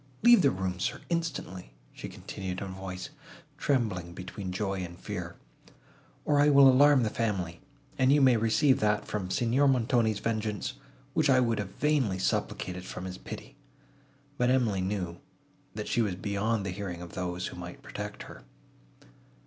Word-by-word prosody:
"Leave 240 -3 +8
the 140 - +5
room, 95 -4 -3
sir, - - -1
instantly," 160 - -3 0.2
she - - -7
continued 95 -2 -6
in - - -4
a 95 - -6
voice, 95 -1 -6 0.5
trembling 105 -11 0
between 90 +1 -6
joy 95 0 -2
and 85 -1 -6
fear, - - -5 0.9
"or 145 -1 +3
I 145 - +5
will 140 -1 +8
alarm 135 0 +6
the 110 - 0
family, 95 -7 -2 0.4
and 130 0 +5
you 145 - +5
may 130 -3 +6
receive 115 +5 +3
that 105 0 +1
from 95 -3 -3
Signor 120 +7 +2
Montoni's 120 -4 +2
vengeance, 110 -2 -2 0.4
which - - +2
I 135 - +6
have 115 -6 +1
vainly 140 -11 +2
supplicated 90 -1 -2
from 90 0 -7
his 95 0 -6
pity." - - -9 0.8
But 125 0 +3
Emily 120 -7 +2
knew, 90 -3 -3 0.6
that 105 -1 -4
she 120 - +1
was 100 -5 0
beyond 100 +2 -1
the 95 - -2
hearing 90 -2 -5
of 85 - -10
those, 90 -1 -3
who - - -6
might 90 0 -9
protect - - -6
her. - - -11
105 Hz, 165 wpm, -29 LUFS, 95-125 Hz, 0.9 s, Leave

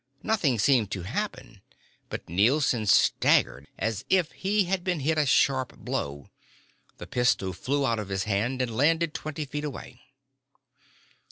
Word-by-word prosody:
Nothing 180 - +1
seemed 115 -1 +3
to 95 - -4
happen 130 - -5 0.5
but - - -6
Nielson 115 - +2
staggered 70 -6 +3
as 110 0 -2
if 180 -4 +2
he 205 +2 0
had 185 0 -2
been 180 -4 -1
hit 155 +3 +1
a 150 - +2
sharp 130 0 +2
blow. 70 0 -4 0.7
The - - -8
pistol 115 -6 0
flew 140 +9 -1
out 115 -3 0
of 105 -2 -6
his 95 0 -1
hand 110 +6 -1
and 115 -3 -4
landed 160 +4 +2
twenty 155 0 -5
feet 145 +2 -5
away. 150 -2 -7
130 Hz, 150 wpm, -27 LUFS, 105-155 Hz, 0.7 s, seemed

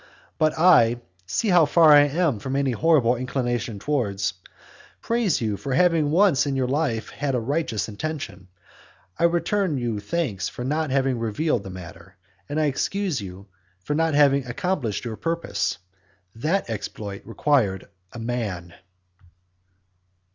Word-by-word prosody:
But 155 0 +2
I 120 -9 +5 0.3
(see 210 - 0
how 175 -4 +5
far 160 0 +6
I 145 0 +7
am 150 - 0
from 130 +6 -4
any 140 -1 +1
horrible 130 -2 +3
inclination 120 -3 -2
towards,) 100 - -1 0.7
praise 230 - 0
you 105 -3 -1
for 135 +3 -3
having 165 -2 +3
once 165 -4 +3
in 140 - -1
your 130 -1 0
life 135 -5 -1
had 140 -3 -2
a - - +1
righteous 115 - -2
intention; 115 -3 -6 0.7
I - - +4
return 175 0 +1
you 120 -4 -2
thanks 105 - -2
for 125 - -7
not 155 +3 -1
having 135 -2 +1
revealed 115 +3 0
the 95 - -9
matter; 90 +1 -11 0.3
and 145 +2 -1
I 155 - +2
excuse 165 - -1
you 95 0 -9 0.3
for 95 - -3
not 160 0 +1
having 140 -2 +4
accomplished 125 - -2
your 110 -2 -5
purpose. 165 - -2 0.6
That 155 +12 -1
exploit 105 -2 -6
required 115 -6 0 0.2
a - - -10
man. 110 -8 -4
135 Hz, 145 wpm, -24 LUFS, 110-155 Hz, 0.7 s, I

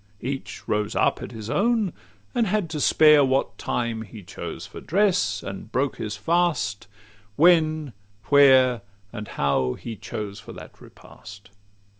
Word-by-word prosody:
Each 135 +2 -6
rose 105 0 -1
up - - +1
at - - -7
his 110 -3 -8
own, 215 - +1 0.4
and 230 -2 +1
had 190 -4 -1
to 150 -3 -3
spare 150 -1 +6
What 135 0 0
time 115 -2 -2
he 110 -1 -10
chose 85 - -7
for - - -10
dress, 185 - +1
and 100 +2 -8
broke 135 +3 -1
his 105 -1 -4
fast 165 - 0 0.5
When, 155 - +3 0.4
where, 130 -4 +6 0.3
and 110 -3 -6
how 65 -3 0
he 115 - -7
chose 105 -1 -6
for - - -11
that - - -13
repast. 100 +1 -14
130 Hz, 145 wpm, -24 LUFS, 105-160 Hz, 0.5 s, spare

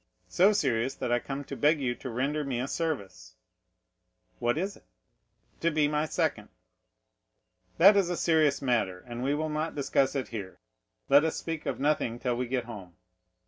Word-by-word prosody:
"So 190 +4 +5
serious, 130 - 0
that 120 - -3
I 120 - +3
come 135 +3 -5
to - - -7
beg 150 +1 +3
you 125 -3 0
to 130 - -8
render 140 +6 -1
me 130 -4 -2
a 130 - -2
service." 100 - -4 1.0
"What 120 +3 +1
is 195 +4 -2
it?" - - -21 0.7
"To 170 - +2
be 155 -2 +2
my 150 +1 0
second." - - -1 1.3
"That 195 +5 +8
is 195 -3 +3
a 175 - -2
serious 155 -4 +2
matter, 100 -8 0
and 120 0 -6
we 140 +3 +1
will 155 +1 -1
not 155 +2 -2
discuss 140 -1 +1
it 135 - -2
here; 100 -5 -7 0.5
let 140 +2 +6
us 160 - 0
speak 165 -2 -5
of - - -2
nothing 140 -5 0
till 125 0 -1
we 125 +1 -2
get 125 -1 -2
home. 100 -7 -10
140 Hz, 185 wpm, -29 LUFS, 120-155 Hz, 1.3 s, That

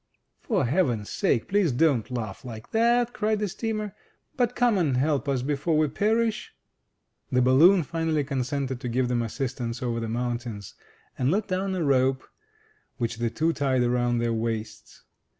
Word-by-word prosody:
"For - - 0
heaven's 120 - 0
sake, 115 - +1
please 200 -6 +2
don't 125 -4 +2
laugh 115 -5 -5
like 110 -4 -9
that," 235 +1 +2
cried 215 0 0
the 210 0 -1
steamer, 215 +1 -3 0.4
"but 245 -2 0
come 240 -5 +3
and 145 -7 +1
help 145 0 0
us, 130 -3 0
before 150 +3 0
we 155 -1 +2
perish!" 220 +6 0 0.8
The 125 - +3
balloon 165 +9 +6
finally 160 0 -1
consented 135 -1 -2
to 125 - -3
give 125 +1 0
them 120 -1 +1
assistance 120 0 -4
over 120 -1 -1
the 115 -1 -4
mountains, 120 -3 -4 0.5
and 130 0 +2
let 200 +6 0
down 190 +1 -1
a 180 - -1
rope, 130 -2 +2 0.7
which 115 -2 -2
the 120 0 0
two 160 +7 0
tied 135 -3 +1
around 120 0 +1
their 115 0 0
waists. 110 -1 -4
135 Hz, 165 wpm, -26 LUFS, 120-180 Hz, 0.8 s, balloon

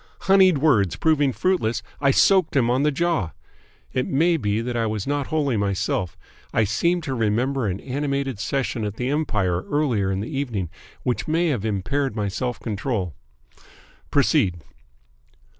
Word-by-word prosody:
Honeyed 190 -4 +5
words 120 - +3
proving 150 -4 +2
fruitless, 150 -7 0 0.2
I 140 - +3
soaked 185 +4 +4
him 120 -3 +3
on 130 +2 +2
the 150 - +3
jaw. 155 - 0 0.6
It 130 - 0
may 165 +5 +3
be 105 -7 0
that 120 +1 -3
I 115 -1 +1
was 105 -2 -3
not 145 -1 -1
wholly 145 -6 0
myself. 100 -3 -1 0.3
I 115 - +2
seem 170 - +1
to 140 -4 -3
remember 120 +2 0
an 95 0 -2
animated 140 -3 -2
session 120 +1 -2
at 105 -1 -3
the 125 +3 -2
Empire 100 - 0
earlier 125 -10 +1
in 95 - -1
the 115 +8 -5
evening, 115 - -2 0.3
which 125 - -1
may 165 +2 +2
have 125 -9 -1
impaired 110 +5 -1
my 105 -2 -1
self 125 +5 -3
control. 105 - -3 1.0
Proceed!" 85 -4 +2
125 Hz, 160 wpm, -23 LUFS, 105-145 Hz, 1.0 s, Honeyed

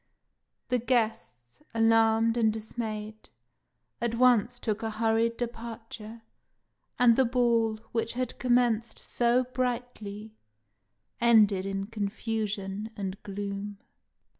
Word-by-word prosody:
The 250 -1 +2
guests, 220 - -2
alarmed 225 0 +4
and 225 -2 +3
dismayed, 215 -1 -5 0.7
at 235 -1 0
once 245 -1 +3
look 215 -2 -1
a 225 - -2
hurried 225 +1 +1
departure, 230 -1 -7 0.7
and 245 -3 +6
the 265 - +4
ball, 235 -3 +2
which 230 -1 -1
had 250 0 -3
commenced 240 -2 +2
so 240 +1 +2
brightly, 245 -4 -4 0.9
ended 210 -5 +4
in 195 0 -2
confusion 210 -1 -3
and 195 0 -4
gloom. 200 0 -5
225 Hz, 100 wpm, -28 LUFS, 210-235 Hz, 0.9 s, and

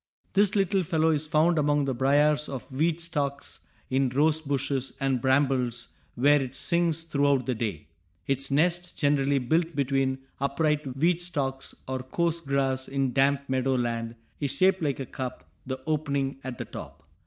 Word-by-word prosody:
This 200 0 +3
little 195 -1 +2
fellow 160 -2 +1
is 155 0 0
found 155 +2 +3
among 145 -1 +2
the 135 - -1
briars 145 +4 +2
or 135 - -3
weed 160 +5 +1
stalks, 145 -4 -3 0.2
in 130 0 +2
rose 150 +5 +2
bushes 135 -2 -2
and 135 -3 0
brambles, 130 -3 +1 0.3
where 145 +3 +4
it 130 0 -5
sings 170 0 +1
throughout 140 -4 +1
the 130 - 0
day. 105 -10 -4 0.4
Its 135 0 -1
nest, 175 +5 +1
generally 145 -1 +2
built 160 +6 0
between 135 -1 +1 0.2
upright 140 -1 0
weed 170 +4 +2
stalks 135 -6 -2
or 130 0 -2
coarse 170 +6 -1
grass 135 -3 0
in 135 -2 -1
damp 140 +1 +2
meadow 130 0 +1
land, 115 -1 -2 0.2
is 140 -3 -1
shaped 190 0 +3
like 145 -4 -1
a 135 - -3
cup, 125 - -6 0.2
the 130 0 -3
opening 140 -3 -1
at 130 -1 -5
the - - -5
top. - - -10
140 Hz, 165 wpm, -27 LUFS, 130-155 Hz, 0.4 s, where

